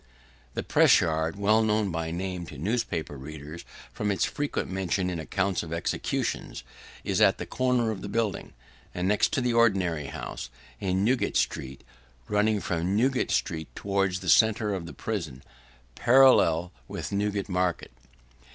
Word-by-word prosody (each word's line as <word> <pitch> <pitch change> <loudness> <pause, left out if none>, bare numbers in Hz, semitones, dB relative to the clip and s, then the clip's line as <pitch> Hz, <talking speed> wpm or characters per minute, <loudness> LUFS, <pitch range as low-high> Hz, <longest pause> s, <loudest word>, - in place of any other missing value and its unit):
The - - -2
press - - +5
yard, 80 +2 0
well 105 +3 +3
known 105 -2 +1
by 80 0 -3
name 90 0 -4
to - - -10
newspaper 90 - -2
readers, 75 +4 -9 0.3
from 105 - -2
its 100 - +1
frequent 145 0 -2
mention 95 -1 -1
in 85 - -3
accounts 95 +3 -1
of 80 - -8
executions, 85 -6 -2 0.4
is - - 0
at - - +5
the - - -5
corner 125 -3 +1
of 100 - -6
the 100 - -6
building, 110 -1 -2 0.4
and 90 +1 -1
next 105 +1 +2
to - - +1
the 125 -1 0
ordinary's 95 -10 +2
house, - - -6 0.3
in 95 +1 0
Newgate 125 +2 +1
street: 65 0 -2 0.4
running 105 0 +2
from 85 +3 -1
Newgate 130 +4 +1
street, 80 -2 -1
towards 95 -2 -1
the 95 - -3
centre 110 0 +4
of 90 -3 -4
the - - -8
prison, 80 - -5 0.5
parallel 115 - +5 0.2
with - - -5
Newgate 100 0 -1
market. 90 -2 -1
95 Hz, 155 wpm, -27 LUFS, 85-110 Hz, 0.5 s, press